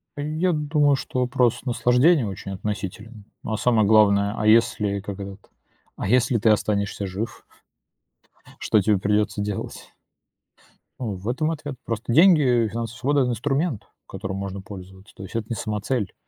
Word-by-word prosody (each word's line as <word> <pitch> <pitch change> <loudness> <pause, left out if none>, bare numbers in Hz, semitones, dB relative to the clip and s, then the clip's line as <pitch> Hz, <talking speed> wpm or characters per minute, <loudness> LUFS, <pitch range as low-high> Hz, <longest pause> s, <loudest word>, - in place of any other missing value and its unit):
Э, 145 - -5
я 155 +5 0
думаю, 150 -2 +2
что 130 - -4
вопрос 125 -1 +1
наслаждения 125 +4 +3
очень 100 -1 -6
относителен, 105 +2 -6 0.2
но, 110 - -3
а 110 - -1
самое 110 -4 +2
главное, 100 -1 +4
а 105 - -2
если, 105 -2 +3
как 100 0 -7
этот, 100 0 -9 0.5
а - - -4
если 120 +1 +3
ты 110 +1 +2
останешься 100 -1 0
жив, 105 +5 -6 1.2
что 110 - +2
тебе 105 0 +2
придётся 105 +1 0
делать? 105 -1 -5 1.1
Э, - - -5
в 100 -3 -5
этом 155 +6 0
ответ. 145 -3 -6
Просто 115 +1 -3
деньги, 165 +1 +6 0.2
э, - - -1
финансовая 115 +2 -5
свобода- 145 +2 +1
это 125 -1 +1
инструмент, 135 - -1 0.2
которым 95 0 -5
можно 100 0 -5
пользоваться. 95 0 -12
То 95 - -9
есть 95 - -10
это 110 -2 -2
не 115 - -2
самоцель. 105 +1 -2
110 Hz, 160 wpm, -23 LUFS, 100-125 Hz, 1.2 s, деньги